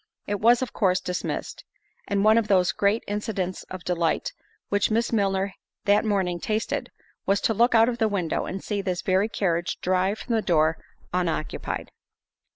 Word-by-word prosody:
It 205 0 -2
was 235 +4 +5
of 255 - -6
course 185 -3 +2
dismissed—and 195 +2 -5
one 220 +1 +6
of 220 - -2
those 185 -3 +3
great 205 +3 +1
incidents 200 -3 -3
of 185 -2 -7
delight 170 -2 0 0.4
which 205 -1 +2
Miss 230 +2 0
Milner 195 -2 +1 0.3
that 205 +1 +4
morning 190 -5 0
tasted, 215 +5 -2 0.4
was 200 +1 +3
to 225 - +2
look 235 +3 +3
out 225 0 +6
of 240 -1 -2
the 220 - +3
window, 180 -6 -1
and 190 +1 -5
see 205 -2 -2
this 185 -2 -2
very 190 +3 +2
carriage 175 -5 -1
drive 185 +3 +1
from 240 - -4
the 225 - +2
door 160 -4 +2 0.3
unoccupied. 170 -4 -2
200 Hz, 165 wpm, -25 LUFS, 180-215 Hz, 0.4 s, one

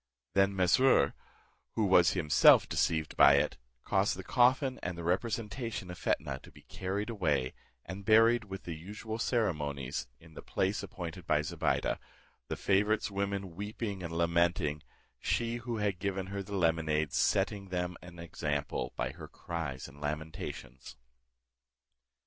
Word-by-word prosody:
Then 95 0 +3
Mesrour, 95 - +4 0.6
who 110 - +1
was 90 -2 +5
himself 75 -7 +6
deceived 80 -2 0
by 70 0 +8
it, 70 - +1 0.2
caused - - +1
the - - -6
coffin 130 +2 +3
and 90 -1 -4
the 85 - -6
representation 105 +2 -2
of 90 - -9
Fetnah 70 -3 -1
to - - -15
be - - -17
carried 100 +4 -3
away, 75 - 0 0.3
and 95 +4 -7
buried 115 +3 +5
with 95 -1 -7
the 85 - -5
usual 105 +7 -6
ceremonies 75 - -1
in 80 -1 -17
the - - -9
place 95 +2 -1
appointed 85 0 -7
by 75 0 +2
Zobeide, 75 - 0 0.5
the - - -3
favourite's 105 +2 +1
women 100 -2 -3
weeping 105 0 -4
and 85 -2 -5
lamenting, 85 -3 +1 0.4
she 115 0 0
who 120 -1 -4
had 100 -4 -1
given 95 -1 -2
her 100 - -2
the 100 +1 -6
lemonade 80 -4 +1
setting 100 0 +1
them 90 -1 -2
an 85 0 -12
example 75 -6 -3
by - - -2
her - - -10
cries 80 -6 -5
and 70 +1 -15
lamentations. 75 -4 -6
90 Hz, 145 wpm, -31 LUFS, 80-105 Hz, 0.6 s, by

